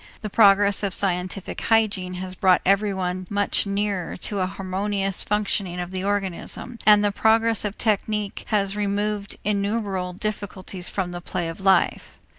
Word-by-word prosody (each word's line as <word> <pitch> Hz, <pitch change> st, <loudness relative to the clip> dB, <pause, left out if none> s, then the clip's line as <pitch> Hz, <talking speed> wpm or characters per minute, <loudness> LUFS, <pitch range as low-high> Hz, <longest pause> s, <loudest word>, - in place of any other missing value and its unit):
The 215 Hz, -2 st, -5 dB
progress 200 Hz, -2 st, +5 dB
of 200 Hz, -3 st, -1 dB
scientific 185 Hz, 0 st, -2 dB
hygiene 205 Hz, -5 st, +1 dB
has 185 Hz, 0 st, -5 dB
brought 185 Hz, 0 st, +3 dB
everyone 190 Hz, -2 st, 0 dB
much 205 Hz, 0 st, +2 dB
nearer 200 Hz, -3 st, -2 dB
to 200 Hz, +2 st, -3 dB
a 185 Hz, -, +1 dB
harmonious 195 Hz, +1 st, 0 dB
functioning 200 Hz, -3 st, -1 dB
of 175 Hz, 0 st, -5 dB
the 185 Hz, 0 st, -4 dB
organism, 205 Hz, +4 st, -2 dB
and 210 Hz, -1 st, +7 dB
the 205 Hz, -, +2 dB
progress 225 Hz, +1 st, +2 dB
of 210 Hz, -1 st, -4 dB
technique 210 Hz, -2 st, -1 dB
has 200 Hz, -2 st, +1 dB
removed 205 Hz, 0 st, -2 dB
innumerable 200 Hz, -3 st, -1 dB
difficulties 190 Hz, -2 st, -4 dB
from 185 Hz, -3 st, -3 dB
the 175 Hz, 0 st, -6 dB
play 175 Hz, -1 st, -3 dB
of 165 Hz, +4 st, -8 dB
life. 190 Hz, -1 st, +2 dB
200 Hz, 150 wpm, -23 LUFS, 185-210 Hz, -, and